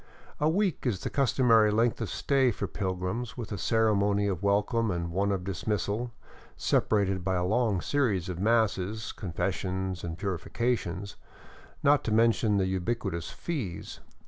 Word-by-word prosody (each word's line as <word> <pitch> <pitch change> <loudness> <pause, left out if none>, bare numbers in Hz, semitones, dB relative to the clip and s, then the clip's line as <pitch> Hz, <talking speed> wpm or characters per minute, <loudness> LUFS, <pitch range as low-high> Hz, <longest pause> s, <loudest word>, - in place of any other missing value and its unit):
A 150 - +3
week 185 -5 0
is 100 -6 -1
the - - -3
customary 120 -5 +4
length 115 +3 +1
of 115 - -2
stay 135 -2 +2
for 110 - -2
pilgrims, 100 +6 -3
with 115 -4 -6
a 100 - -2
ceremony 105 -2 +2
of 95 -3 -1
welcome 105 +3 +1
and 85 -2 -2
one 100 +3 +1
of 95 -2 -1
dismissal, 105 +5 -2 0.5
separated 95 -3 +1
by 95 +1 0
a 90 0 0
long 105 -2 +1
series 110 -11 0
of 90 -2 -4
masses, 110 -1 +1
confessions 95 0 -3
and 85 -1 -4
purifications 100 0 -2 0.3
— - - -23
not 145 0 +4
to 115 - -1
mention 110 -1 +3
the 95 - +2
ubiquitous 95 -2 -2
fees. 125 - -5
100 Hz, 150 wpm, -29 LUFS, 95-115 Hz, 0.5 s, customary